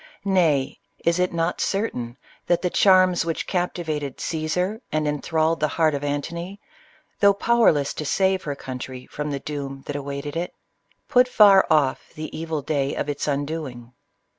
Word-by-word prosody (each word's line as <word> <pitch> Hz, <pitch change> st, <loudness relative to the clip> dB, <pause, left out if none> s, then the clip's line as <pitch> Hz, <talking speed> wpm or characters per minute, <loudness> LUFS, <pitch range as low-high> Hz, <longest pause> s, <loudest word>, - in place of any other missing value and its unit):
Nay, 165 Hz, -9 st, +2 dB
— -, -, -28 dB
is 170 Hz, +1 st, +2 dB
it 180 Hz, 0 st, +1 dB
not 165 Hz, +1 st, -1 dB
certain, 125 Hz, -, -2 dB, 0.3 s
that 175 Hz, +1 st, +2 dB
the 180 Hz, -, 0 dB
charms 185 Hz, -2 st, +5 dB
which 165 Hz, -1 st, -2 dB
captiva 175 Hz, -4 st, -2 dB
ted 140 Hz, -3 st, -7 dB
Ca?sar 180 Hz, +7 st, -2 dB
and 155 Hz, -1 st, 0 dB
enthralled 160 Hz, +2 st, 0 dB
the 155 Hz, -, +2 dB
heart 155 Hz, 0 st, +1 dB
of 140 Hz, 0 st, -3 dB
Antony, 170 Hz, +7 st, -4 dB, 0.6 s
though 200 Hz, -1 st, +5 dB
powerless 200 Hz, -11 st, +3 dB
to -, -, -5 dB
save 190 Hz, +5 st, +1 dB
her 145 Hz, -4 st, -4 dB
country 130 Hz, -1 st, -7 dB
from 150 Hz, 0 st, -5 dB
the 140 Hz, -1 st, -2 dB
doom 135 Hz, -2 st, -6 dB
that 145 Hz, -, -5 dB
awaited 140 Hz, +1 st, -5 dB
it, 175 Hz, +2 st, -3 dB, 0.5 s
put 250 Hz, 0 st, +4 dB
far 205 Hz, -5 st, +6 dB
off 145 Hz, -4 st, +1 dB
the 155 Hz, 0 st, -6 dB
evil 160 Hz, -2 st, -3 dB
day 140 Hz, -1 st, -1 dB
of 145 Hz, -, -3 dB
its 145 Hz, 0 st, -3 dB
undoing? 140 Hz, -4 st, -4 dB
155 Hz, 165 wpm, -23 LUFS, 140-180 Hz, 0.6 s, far